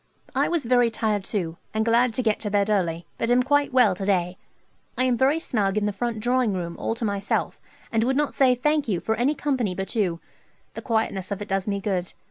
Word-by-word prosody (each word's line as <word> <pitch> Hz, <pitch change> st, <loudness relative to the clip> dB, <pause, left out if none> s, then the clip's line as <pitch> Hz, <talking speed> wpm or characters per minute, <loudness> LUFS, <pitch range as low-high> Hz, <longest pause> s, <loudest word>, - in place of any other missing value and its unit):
I -, -, +2 dB
was 335 Hz, -6 st, -1 dB
very 245 Hz, 0 st, +4 dB
tired 215 Hz, -3 st, -1 dB
too, 170 Hz, -6 st, -3 dB, 0.2 s
and 220 Hz, 0 st, +1 dB
glad 235 Hz, 0 st, +3 dB
to 255 Hz, -, -1 dB
get 215 Hz, -2 st, +1 dB
to 210 Hz, -, -3 dB
bed 205 Hz, +1 st, +1 dB
early, 170 Hz, -4 st, 0 dB
but 230 Hz, -, 0 dB
am 245 Hz, +1 st, +4 dB
quite 290 Hz, +2 st, +2 dB
well 250 Hz, -7 st, +5 dB
to 185 Hz, -, -6 dB
day. 180 Hz, -2 st, +1 dB, 0.6 s
I 255 Hz, -, +2 dB
am 255 Hz, -1 st, +2 dB
very 265 Hz, +6 st, +3 dB
snug 210 Hz, -, -1 dB
in 210 Hz, -, +1 dB
the 210 Hz, -, -1 dB
front 230 Hz, +2 st, -3 dB
drawing 245 Hz, -1 st, +1 dB
room 170 Hz, -2 st, -4 dB
all 225 Hz, -, -1 dB
to 230 Hz, -, -3 dB
myself, 200 Hz, -1 st, -2 dB, 0.3 s
and 225 Hz, -1 st, +2 dB
would 265 Hz, +3 st, +1 dB
not 295 Hz, -1 st, 0 dB
say 255 Hz, -2 st, +4 dB
"thank 300 Hz, +3 st, +1 dB
you" 190 Hz, -6 st, 0 dB
for 220 Hz, -, -1 dB
any 250 Hz, +7 st, +1 dB
company 255 Hz, -12 st, -1 dB
but 195 Hz, +1 st, -4 dB
you. 180 Hz, -7 st, 0 dB, 0.5 s
The -, -, -6 dB
quietness 220 Hz, -5 st, -1 dB
of 200 Hz, -1 st, -3 dB
it 205 Hz, -, -12 dB
does 195 Hz, 0 st, -1 dB
me 200 Hz, -1 st, -1 dB
good. 190 Hz, -2 st, -2 dB
220 Hz, 235 wpm, -24 LUFS, 195-250 Hz, 0.6 s, well